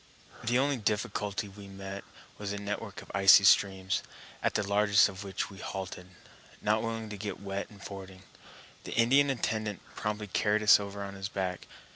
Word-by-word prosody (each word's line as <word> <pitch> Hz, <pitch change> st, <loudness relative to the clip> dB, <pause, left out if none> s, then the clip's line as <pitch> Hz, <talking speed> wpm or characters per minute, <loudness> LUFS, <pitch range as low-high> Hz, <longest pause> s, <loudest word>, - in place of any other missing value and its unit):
The 120 Hz, +2 st, +2 dB
only 140 Hz, +1 st, +2 dB
difficulty 105 Hz, -1 st, -1 dB
we 100 Hz, 0 st, -12 dB
met 95 Hz, 0 st, -7 dB, 0.4 s
was 100 Hz, -1 st, -4 dB
a 100 Hz, -, -3 dB
network 100 Hz, 0 st, -5 dB
of -, -, -13 dB
icy 95 Hz, 0 st, +8 dB
streams, 95 Hz, -1 st, +4 dB, 0.4 s
at -, -, 0 dB
the 105 Hz, -, 0 dB
largest 100 Hz, 0 st, +5 dB
of 95 Hz, +1 st, -8 dB
which 95 Hz, 0 st, -3 dB
we 95 Hz, -, -11 dB
halted, 90 Hz, -1 st, -6 dB, 0.5 s
not 105 Hz, +1 st, +1 dB
willing 115 Hz, -1 st, -3 dB
to 105 Hz, -, -6 dB
get 100 Hz, +1 st, -5 dB
wet 100 Hz, 0 st, -4 dB
in 105 Hz, -, -14 dB
fording. 95 Hz, -2 st, -9 dB, 0.6 s
The -, -, -6 dB
Indian 135 Hz, +5 st, +4 dB
attendant 110 Hz, -5 st, -2 dB
promptly 105 Hz, 0 st, -3 dB
carried 105 Hz, +2 st, +1 dB
us 105 Hz, -, +8 dB
over 100 Hz, 0 st, -5 dB
on 100 Hz, 0 st, -6 dB
his 95 Hz, 0 st, -5 dB
back. 95 Hz, -3 st, -3 dB
100 Hz, 175 wpm, -30 LUFS, 95-105 Hz, 0.6 s, icy